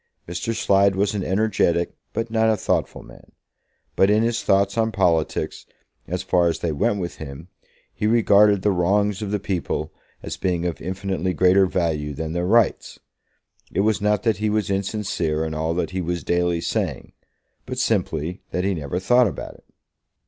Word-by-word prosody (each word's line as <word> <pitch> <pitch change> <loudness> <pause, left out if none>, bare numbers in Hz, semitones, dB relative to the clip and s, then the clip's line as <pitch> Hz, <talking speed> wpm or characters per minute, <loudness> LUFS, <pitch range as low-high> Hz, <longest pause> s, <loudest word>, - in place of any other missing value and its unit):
Mr. 90 +7 -3
Slide 100 -1 +3
was 100 +1 +1
an 100 -3 -2
energetic 95 -4 +1 0.2
but 115 0 -3
not 110 0 +3
a 110 - +2
thoughtful - - -1
man; - - -17 0.6
but 95 - +4
in 105 +2 +3
his 115 0 0
thoughts 100 0 +2
on 115 -1 +1
politics, 85 -6 0 0.4
as 90 +2 -3
far 90 -2 +2
as 85 - 0
they 85 - -2
went 90 +7 0
with 85 -2 -5
him, 75 +3 -9 0.4
he 105 - -1
regarded 105 -3 +4
the 105 - +3
wrongs 100 +3 +1
of 105 - -3
the 105 - 0
people 90 -5 -3 0.3
as - - -5
being 90 -2 -1
of 85 -2 -3
infinitely 95 -1 -2
greater 95 +2 +4
value 80 -5 -1
than 80 +2 -4
their 85 +1 -1
rights. 115 +1 +2 0.7
It 95 - +1
was 110 0 +1
not 105 0 +1
that 110 -3 +1
he 105 0 0
was 105 -2 0
insincere 95 -6 -1
in 80 - -4
all 80 +2 -1
that 90 - -2
he 95 0 -2
was 85 0 -3
daily 85 -1 0
saying; - - -3 0.5
but - - -5
simply 80 +4 -1
that 90 - -2
he 100 +1 +1
never 75 -1 -4
thought 120 +6 +4
about - - -6
it. - - -22
95 Hz, 180 wpm, -22 LUFS, 85-105 Hz, 0.7 s, but